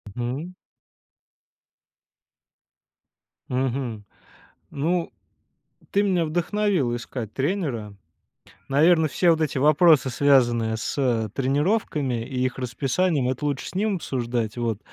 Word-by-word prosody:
Мгм. 130 +9 -4 3.0
Мгм. 125 -4 -2 0.7
Ну, 165 +4 -1 0.8
ты 200 - +2
меня 185 -5 +1
вдохновила 175 -4 0
искать 120 -3 -6
тренера. 135 - -2 0.7
Наверно, 160 +3 +4
все 175 +4 +2
вот 160 -1 +1
эти 155 -3 -1
вопросы, 150 0 +5
связанные 120 -4 +3
с 115 -3 -1
тренировками 140 - 0
и 130 -1 -2
их 130 - -3
расписанием, 135 +3 0
это 130 +3 -3
лучше 140 -2 -2
с - - -14
ним 205 +1 +1
обсуждать. 120 - -3
Вот. 115 -4 -1
135 Hz, 100 wpm, -24 LUFS, 120-165 Hz, 3.0 s, вопросы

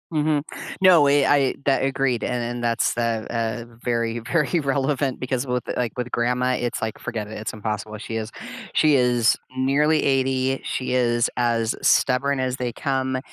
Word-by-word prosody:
Mhm. 150 -2 +1 0.4
No, 185 -5 +7
we 140 0 +4
I, 140 -2 +3
that 135 -1 +2
I - - +2
agreed, 135 -3 0
and 125 -1 -2
and 120 +1 -4
that's 115 -1 +1
the 115 -2 -1
uh, 115 -1 -2 0.2
very, 115 -1 -1
very 150 +8 0
relevant 140 -1 -1
because 130 +1 -2
with 125 -1 -1
like 120 -1 -2
with 125 0 -3
grandma, 125 +2 +1
it's 120 -1 -3
like 110 -1 -3
forget 110 -3 -4
it, 110 - -9
it's 110 - -5
impossible. 105 0 -4
She 115 +1 -5
is 110 -1 -4 0.4
she 155 -2 +4
is 125 -3 +3 0.2
nearly 145 +4 +2
80. 135 -1 +1
She 130 - -2
is 120 -1 +2
as 115 -2 +1
stubborn 135 +1 +2
as 130 0 -1
they 125 -2 -3
come. 130 0 -1
125 Hz, 175 wpm, -23 LUFS, 115-135 Hz, 0.4 s, No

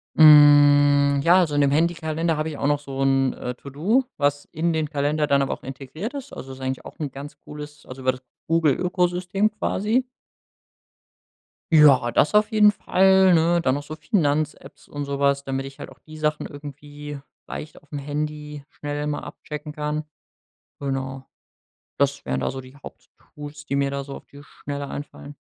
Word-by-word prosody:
Hm, 145 -2 +7
ja, 175 +4 +6
also 160 -5 +1
in 145 - +3
dem 140 -1 +3
Handykalender 165 +1 0
hab 155 0 -2
ich 155 -2 -5
auch 140 - -1
noch 145 0 +2
so 135 -2 -6
'n, 135 -1 +2
äh, 125 - -5
To 140 - -11
do, 195 - +1
was 145 0 0
in 165 +2 0
den 155 -2 -1
Kalender 150 +1 0
dann 140 -1 +2
aber 135 - -1
auch - - -10
integriert 135 - -7
ist. 280 -1 -8
Also 135 - -8
ist 130 - -10
eigentlich 130 0 -4
auch - - -12
'n 150 -3 -3
ganz 145 +2 -9
cooles 150 0 -10
also 130 +1 -10
über 130 0 +2
das 130 0 -11 0.3
Google 165 -3 +3
Ökosystem 180 +3 0
quasi. 220 +5 0 1.7
Ja, 140 -6 +6
das 150 - +2
auf 210 +1 +4
jeden 210 -1 +5
Fall, 190 -1 +4
ne, 170 +1 +3
dann 130 -4 +1
noch 145 - -4
so 155 +2 -8
Finanz-Apps 155 - -2
und 145 0 -5
so 140 0 -4
was, 140 0 +1
damit 135 0 -3
ich 135 0 -11
halt - - -8
auch - - -17
die 155 0 -13
Sachen 150 0 -1
irgendwie 145 0 -9 0.3
leicht 155 - -8
aufm 145 0 -8
Handy 150 0 -5
schnell 145 0 -5
immer 150 0 -3
abchecken 150 0 -8
kann. 150 0 -3 0.8
Genau. 135 -1 -3 0.7
Das 140 0 0
wären 65 0 -2
da - - -1
so 135 +1 -6
die 130 +1 -15
Haupttools, 145 +1 -12
die 140 - -1
mir 140 0 0
da 140 0 -3
so 140 0 -8
auf - - -13
die 140 0 -14
Schnelle 140 0 -7
einfallen. 145 0 -8
145 Hz, 185 wpm, -23 LUFS, 140-155 Hz, 1.7 s, Hm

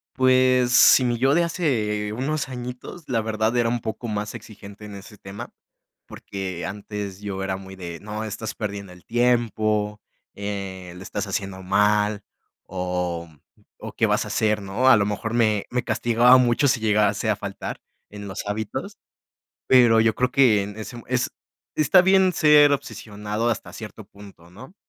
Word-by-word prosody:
Pues, 130 -1 +3
sí, 130 +1 +7
mi 120 -1 0
yo 135 +3 +3
de 170 +2 +3
hace 110 - -1
unos 140 +4 -2
añitos, 125 +6 -8
la 115 -3 0
verdad, 110 +1 -1
era 120 -1 +2
un 120 0 -1
poco 110 +2 -5
más 105 +1 -4
exigente 105 -1 -11
en 105 - -9
ese 100 +2 -12
tema, 95 +1 -9 0.5
porque 95 -3 -6
antes 100 -1 -6
yo 100 -2 -5
era 95 -1 -2
muy 95 0 -11
de: 85 -3 -7
"No, 105 +1 -6
estás 110 +1 -5
perdiendo 100 -3 -6
el 90 - -17
tiempo, 110 -3 0 0.3
eh, 95 -3 -6
lo 90 - -10
estás 100 +2 -4
haciendo 95 -1 -4
mal 105 +2 +1 0.4
o, 90 -2 -3 0.3
mm, - - -28 0.2
o - - -7
¿qué - - +1
vas - - +1
a - - -8
hacer?", 105 -1 0
¿no? 100 +7 +1
A 130 - +8
lo 100 -1 +1
mejor, 110 +2 -3
me 110 -4 +2
me 125 0 -1
castigaba 120 +2 +4
mucho 125 +3 +3
si 125 - +1
llegase 105 0 +1
a 105 - +2
faltar 100 -1 -6 0.3
en 105 -1 -9
los 95 +2 -6
hábitos, 105 +1 -5 0.7
pero 120 -3 +6
yo 110 -1 +3
creo 125 +2 0
que 120 -7 +4
en 105 +1 -8
ese 120 +2 -8
es 130 0 0 0.4
está 180 +4 +5
bien 190 0 +4
ser 150 -3 +6
obsesionado, 105 -4 -3
hasta 115 - -3
cierto 110 -1 -9
punto, 100 -4 -16
¿no? 130 - -13
105 Hz, 170 wpm, -23 LUFS, 100-125 Hz, 0.7 s, A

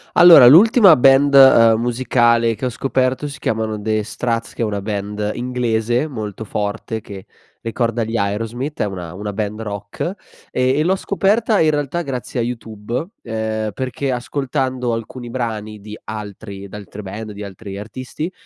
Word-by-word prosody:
Allora, 175 -8 +9
l'ultima 195 - +7
band, 135 +2 +5
uhm, 115 -5 +7
musicale 120 -1 +2
che 130 - -7
ho 125 - 0
scoperto 130 +3 -1
si 145 +1 -9
chiamano 110 -4 -2
The 110 0 0
Strats, 115 +2 -3
che - - -4
è - - +2
una 105 -2 -2
band 105 0 -3
inglese 120 +1 -1
molto 110 -5 -6
forte 110 +2 -4
che 95 -2 -10 0.3
ricorda 115 0 -1
gli 115 +1 -3
Aerosmith. 115 +8 -3
È - - +2
una 90 -4 -6
una 105 +2 -5
band 105 0 -3
rock, 105 - -5 0.4
e 130 +2 +1
e - - +3
l'ho 185 +4 +2
scoperta 205 +3 +1
in 155 - +4
realtà 145 +2 -2
grazie 130 -3 -4
a - - +1
YouTube, 115 +2 -4 0.2
ehm, 110 -1 -3
perché 130 +3 -3
ascoltando 130 -1 -2
alcuni 120 +2 -7
brani 110 -4 -4
di 105 +1 -9
altri 100 -2 -8
d'altre 105 +1 -9
band, 105 +3 -7
di 105 0 -8
altri 100 0 -9
artisti, 130 - -6
115 Hz, 160 wpm, -19 LUFS, 105-130 Hz, 0.4 s, Allora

